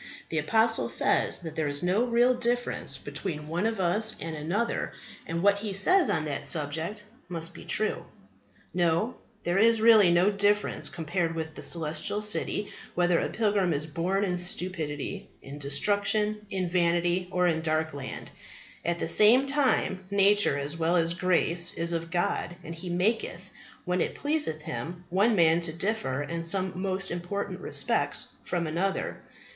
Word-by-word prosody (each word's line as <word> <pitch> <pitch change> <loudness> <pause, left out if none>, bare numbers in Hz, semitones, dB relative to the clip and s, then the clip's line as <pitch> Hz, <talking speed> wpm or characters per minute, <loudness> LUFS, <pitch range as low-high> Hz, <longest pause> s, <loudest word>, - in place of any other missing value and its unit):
The 160 - 0
apostle 225 +8 +3
says - - +3
that 160 -2 -6
there 155 -2 -1
is 145 +2 -1
no 190 +7 +2
real 240 +1 +3
difference 245 0 -1
between 150 -5 -5
one 175 +7 0
of 225 -2 -3
us 210 +5 +2
and 165 0 -5
another; 180 +10 -2 0.3
and 170 +2 -3
what 200 0 +4
he 210 -1 -4
says 360 - +4
on 155 -2 0
that 145 -1 -4
subject 160 +8 -1 0.3
must 165 -1 -5
be - - -11
true. 215 - 0 0.7
No; 175 +6 +1 0.3
there 175 +3 +1
is 225 +1 +5
really 215 -5 +6
no 175 +4 +4
difference 205 +1 +1
compared 165 0 -2
with 160 -1 -4
the - - -9
Celestial 160 +5 -1
City 210 0 -1 0.2
whether 175 -1 +3
a - - -1
pilgrim 205 -5 +1
is 150 +1 -1
born 175 +6 -1
in 180 -3 0
Stupidity, 170 -5 -3
in 140 +2 -9
Destruction, 205 +8 0
in 185 -2 -2
Vanity, 175 +1 +1
or 180 -1 +1
in 160 -2 +1
Darkland. 155 -4 -3 0.5
At 170 0 0
the - - -3
same 235 +6 +5
time, 270 -9 +1
nature, 200 -5 +4
as 145 +3 -3
well 165 +2 +1
as 165 -1 +2
grace, 175 -1 +1
is 170 +1 -1
of 165 0 -3
God, 175 0 -1
and 165 - -7
He 175 +2 -8
maketh, 190 +6 -1 0.3
when 180 -1 0
it - - -2
pleaseth 290 - -1
Him, 165 +9 -6
one 210 +5 +3
man 165 -2 +4
to 170 -1 -2
differ 165 -6 -2
in 165 +3 -4
some 185 +2 +1
most 195 0 -1
important 175 +4 -4
respects - - -1
from 175 -2 -2
another. 175 +5 -2
175 Hz, 160 wpm, -28 LUFS, 165-205 Hz, 0.7 s, really